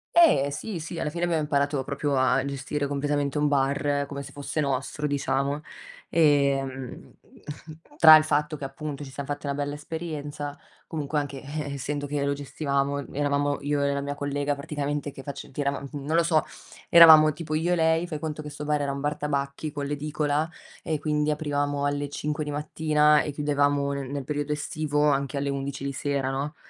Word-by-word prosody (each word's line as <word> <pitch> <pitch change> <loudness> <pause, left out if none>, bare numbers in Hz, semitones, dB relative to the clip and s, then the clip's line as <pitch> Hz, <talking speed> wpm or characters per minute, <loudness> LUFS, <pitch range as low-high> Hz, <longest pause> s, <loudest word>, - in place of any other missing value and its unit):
Eh 305 - +6
sì, 175 +6 -5
sì, 165 +1 -6
alla 150 - -2
fine 175 +1 -1
abbiamo 165 -3 0
imparato 140 -2 0
proprio 140 +1 -1
a 130 0 +3
gestire 140 +1 -3
completamente 145 0 -1
un 150 - +2
bar, 140 0 +1
come 140 0 -6
se - - -10
fosse 145 +2 -4
nostro 140 +2 -2
diciamo. 140 0 0 0.5
Ehm, 140 -5 +1 0.8
tra 155 -1 +10
il 155 - +6
fatto 150 0 0
che 140 - -9
appunto 145 +1 -6
ci 135 - -9
siam 140 +1 -6
fatti 145 0 -4
una 140 - -1
bella 145 0 -3
esperienza, 150 -2 -5 0.3
comunque 150 -2 -2
anche, 140 -2 -5
eh, 145 0 -4
essendo 145 +1 -3
che 145 0 -1
lo 140 - +1
gestivamo 140 0 -2
eravamo 145 0 0
io 145 0 0
e 140 0 +1
la 140 - -1
mia 145 0 -4
collega 145 0 -1
praticamente 145 0 -3
che 135 - -10
face 140 0 -8
che 145 - -4
eravam 140 0 -2
non 145 +2 -3
lo 170 - +5
so, 160 -2 +3 0.5
eravamo 160 -2 +9
tipo 155 0 -6
io 165 +3 +1
e - - +3
lei. 160 +1 +2
Fai 155 -4 -4
conto 155 0 -4
che 150 - -7
sto 150 0 -7
bar 150 -1 +1
era 140 - -1
un 140 - -4
bar 145 +1 -1
tabacchi, 140 +1 -2
con 145 -1 -4
l'edicola, 150 +2 -1 0.3
e 160 -2 -1
quindi 150 -1 0
aprivamo 145 -2 -1
alle 145 0 -1
5:00 150 +1 -3
di 150 - -5
mattina, 150 0 +3
e 150 - -3
chiudevamo 145 -1 +1
nel 140 -2 -4
nel 140 -1 -3
periodo 145 +1 -3
estivo, 150 0 -1
anche 140 0 -1
alle 140 0 -1
11:00 140 0 -4
di 140 - -2
sera 140 -1 -1
no, 140 +4 -3
145 Hz, 195 wpm, -26 LUFS, 140-150 Hz, 0.8 s, tra